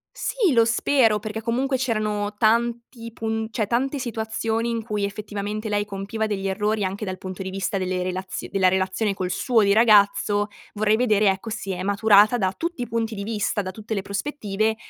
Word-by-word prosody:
Sì, 440 -9 +1
lo 230 -3 +5
spero, 230 -2 +3
perché 215 +1 -5
comunque 260 +4 0
c'erano 215 -4 -1
tanti 230 +1 0
pun 220 -1 -2
cioè 220 -2 -1
tante 260 +6 0
situazioni 225 -1 -2
in 230 -1 -2
cui 210 -2 -2
effettivamente 210 +1 -4
lei 205 0 0
compiva 200 +2 -3
degli 195 -2 -2
errori, 210 +2 0
anche 195 +3 -3
dal 185 -1 -4
punto 185 0 -7
di 190 - -4
vista 195 +1 -2
delle 185 -1 -1
relazio 185 +1 -4
della 190 -2 +3
relazione 190 +3 +1
col 185 -2 -3
suo 230 +1 +2
di 200 - +3
ragazzo; 205 -1 +4 0.3
vorrei 215 +1 +2
vedere, 215 -4 +3
ecco, 190 +4 -2
se 195 -4 -4
è 185 - -4
maturata 205 +3 +5
da 190 -4 +1
tutti 335 -5 -3
i 245 - -3
punti 225 -1 -2
di 200 - -5
vista, 210 -1 -1
da 185 -1 -5
tutte 215 +2 -6
le 200 - -1
prospettive, 215 0 -2
215 Hz, 190 wpm, -23 LUFS, 200-230 Hz, 0.3 s, lo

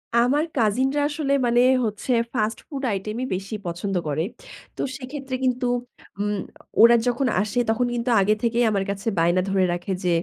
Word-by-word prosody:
আমার 250 +6 +3
কাজিনরা 260 +6 +2
আসলে 295 -2 -2
মানে 240 0 +3 0.2
হচ্ছে 215 +4 -3 0.2
ফাস্ট 220 -2 -1
ফুড 280 -3 -5
আইটেমই 215 +5 -3
বেশি 195 +3 -5
পছন্দ 180 +3 -3
করে। 150 +2 0 0.5
তো - - -4 0.2
সেক্ষেত্রে 270 0 -6
কিন্তু 255 0 +1 0.5
উম 205 0 0 0.4
ওরা 235 +1 +8
যখন 245 +2 +1
আসে, 210 +4 -1
তখন 240 +2 +2
কিন্তু 240 +1 -2
আগে 205 +2 +3
থেকেই 235 +1 +2
আমার 200 -2 0
কাছে 200 +2 -4
বায়না 175 +2 +3
ধরে 195 -1 +2
রাখে, 175 +2 -4
যে 180 - +1
225 Hz, 165 wpm, -23 LUFS, 195-255 Hz, 0.5 s, ওরা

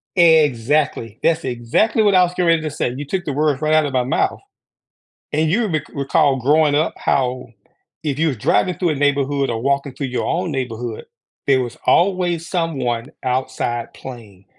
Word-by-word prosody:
Exactly, 145 - +2
that's 165 -2 +1
exactly 130 - +1
what 200 -2 +3
I 180 - +6
was 175 - -1
getting 180 -1 0
ready 165 -1 +4
to 155 - -2
say; 140 -4 -2
you 145 - -5
took 180 +5 -2
the 145 - -3
words 150 0 0
right 155 0 +1
out 155 -1 +4
of 140 - -4
my 125 -1 +2
mouth, 135 - 0 0.9
and 155 +1 +1
you 220 +6 +2
re 155 -3 0
recall 140 0 +2
growing 145 +3 +3
up 155 +3 +1
how 130 -1 0 0.6
if 145 -1 -2
you 165 0 +2
were 135 - -1
driving 180 - +1
through 175 -2 0
a - - 0
neighborhood, 140 -1 +1
or 115 -1 -3
walking 140 -1 0
through 140 - -4
your 125 - -2
own 175 +1 -1
neighborhood, 120 -4 -4 0.4
there 130 -2 +3
was 120 -1 -7
always 175 -2 +2
someone 135 -10 -2 0.2
outside 125 -2 -2
playing. 110 -7 -11
145 Hz, 185 wpm, -19 LUFS, 125-165 Hz, 0.9 s, I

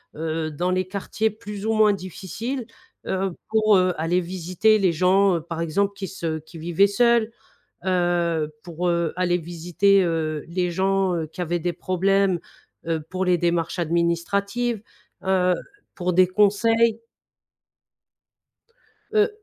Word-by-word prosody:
heu, 160 0 -3
dans 180 +5 -1
les 185 0 0
quartiers 205 +3 -1
plus 210 -1 -8
ou 225 - +1
moins 215 -1 +5
difficiles, 210 - -5 0.4
heu, 190 0 -1 0.2
pour, 215 -1 +4
heu, 185 -1 +2
aller 170 +3 +1
visiter 185 +4 +1
les 185 -3 +2
gens 185 +1 +3
par 165 +1 -6
exemple 195 +5 0
qui 195 -1 -6
se 165 -4 -4
qui 160 +2 -14
vivaient 175 +5 +3
seuls, 235 +2 +3 0.5
heu, 175 -4 +1
pour, 175 +1 -3
heu, 170 -2 +1
aller 180 0 +1
visiter, 175 +4 +2
heu, 160 -3 -1
les 180 0 -1
gens, 190 +1 +1
heu, 160 -2 -2
qui 170 +4 -10
avaient 175 +1 -1
des 175 +1 -1
problèmes, 190 +2 +1 0.5
heu, 165 -1 0
pour 185 0 -1
les 180 -1 +3
démarches 170 +1 -1
administratives, 195 +7 0 0.5
heu, 185 -1 +3 0.4
pour 180 0 -1
des 185 +1 +5
conseils. 225 +4 +3 2.1
Heu, 425 0 +3
185 Hz, 140 wpm, -23 LUFS, 170-200 Hz, 2.1 s, moins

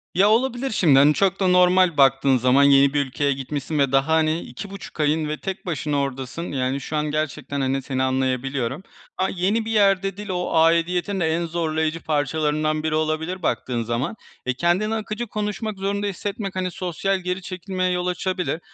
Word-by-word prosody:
Ya, 195 +3 +5
olabilir 250 +3 +1
şimdi, 150 -10 +4
hani, 145 +2 +6
çok 195 +3 +1
da 190 - +2
normal 180 -1 +4
baktığın 135 -1 +4
zaman, 130 +3 +4
yeni 140 0 +5
bir 145 -1 +1
ülkeye 140 +2 0
gitmişsin 140 +3 -4
ve 140 -2 +2
daha, 135 +1 +2
hani, 160 0 +2
2,5 195 +7 -9
ayın 150 +1 +1
ve 150 - -2
tek 190 -1 -6
başına 150 -4 -1
oradasın, 135 +4 -4
yani, 130 0 -1
şu 155 - -5
an 150 - 0
gerçekten, 145 -2 -3
hani, 135 +1 0
seni 130 0 -2
anlayabiliyorum. 130 +2 -1 0.3
A 190 +1 +1
yeni 200 +5 0
bir 225 - -3
yerde 195 -2 +2
dil, 210 0 -7
o 180 -1 -2
aidiyetin 170 +4 +2
de 175 - +1
en 170 - -1
zorlayıcı 160 -1 -1
parçalarından 155 +1 0
biri 155 -1 0
olabilir 155 +4 -1
baktığın 120 -6 -1
zaman. 120 - -2 0.3
Eee, 130 - 0
kendini 175 - +1
akıcı 220 +2 -4
konuşmak 210 0 -3
zorunda 200 +1 -2
hissetmek, 200 0 -4
hani, 185 -1 -2
sosyal 185 +2 -2
geri 180 +1 -3
çekilmeye 185 0 -3
yol 180 0 -1
açabilir 180 -4 -2
160 Hz, 180 wpm, -23 LUFS, 140-190 Hz, 0.3 s, hani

